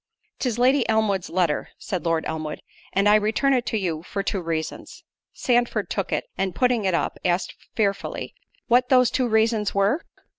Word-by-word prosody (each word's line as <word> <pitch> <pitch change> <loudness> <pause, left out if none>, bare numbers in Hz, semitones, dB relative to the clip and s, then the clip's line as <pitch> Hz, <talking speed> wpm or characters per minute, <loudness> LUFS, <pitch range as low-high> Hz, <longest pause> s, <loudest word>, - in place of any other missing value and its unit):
"'Tis 245 -4 -1
Lady 255 +1 +3
Elmwood's 215 -4 +1
letter," 170 -4 0
said 185 -5 -4
Lord 165 -1 +1
Elmwood, 155 -1 -4 0.3
"and 200 +1 +2
I 210 - +6
return 215 +6 +3
it 250 -2 0
to 220 - 0
you 170 -6 -2
for 195 +3 -4
two 195 -1 -1
reasons." 165 -2 -5 0.3
Sandford 240 -5 0
took 195 -3 -2
it, - - -1
and 190 -2 -1
putting 245 0 +2
it 185 -2 +2
up, - - -2
asked 180 0 0 0.2
fearfully, 200 -3 -1 0.3
"What 250 +1 +3
those 250 -2 +5
two 255 -2 +1
reasons 220 -2 +1
were?" 200 +11 +2
210 Hz, 175 wpm, -24 LUFS, 180-240 Hz, 0.3 s, I